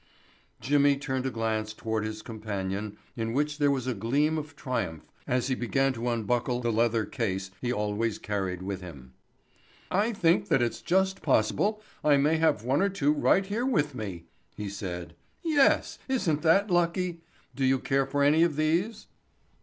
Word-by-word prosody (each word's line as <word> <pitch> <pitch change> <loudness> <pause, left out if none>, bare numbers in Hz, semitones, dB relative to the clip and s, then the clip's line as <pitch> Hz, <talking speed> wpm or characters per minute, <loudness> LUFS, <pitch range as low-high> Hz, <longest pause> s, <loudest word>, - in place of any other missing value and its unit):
Jimmy 140 +2 +3
turned 130 -2 -2
a - - 0
glance 110 -2 -2
toward 110 -1 -2
his 110 0 -5
companion 105 -2 -4 0.2
in 115 -1 -2
which 145 +2 0
there 145 -1 +4
was 135 -3 0
a 130 - 0
gleam 140 +9 +1
of 145 -1 -9
triumph 110 - -3 0.2
as 125 -1 +1
he 135 - +1
began 135 +2 +1
to 120 0 -2
unbuckle 120 +2 0
the 120 -1 0
leather 115 0 +2
case 95 -5 -3
he 125 - -1
always 105 0 -1
carried 95 -3 -3
with 95 0 -4
him. 70 -8 -11 0.8
"I 205 +5 +2
think 175 -6 +2
that - - +3
it's 120 -2 -1
just 190 +1 +1
possible 180 - +1 0.2
I 145 -2 +5
may 150 +3 +3
have 155 -9 +2
one 135 +6 +1
or 200 - +3
two 150 -7 +1
right 190 +5 +3
here 210 +5 -2
with 150 - +1
me," 95 -8 -6 0.3
he 105 -1 -4
said. 90 -3 -6 0.3
"Yes, 300 -5 +3
isn't 180 - 0
that 190 +5 +3
lucky? 175 0 +1 0.3
Do 135 - -2
you 130 0 +4
care 135 +1 0
for 140 +1 +1
any 150 +3 +5
of 170 -3 +3
these?" 170 +9 0
130 Hz, 175 wpm, -28 LUFS, 110-155 Hz, 0.8 s, I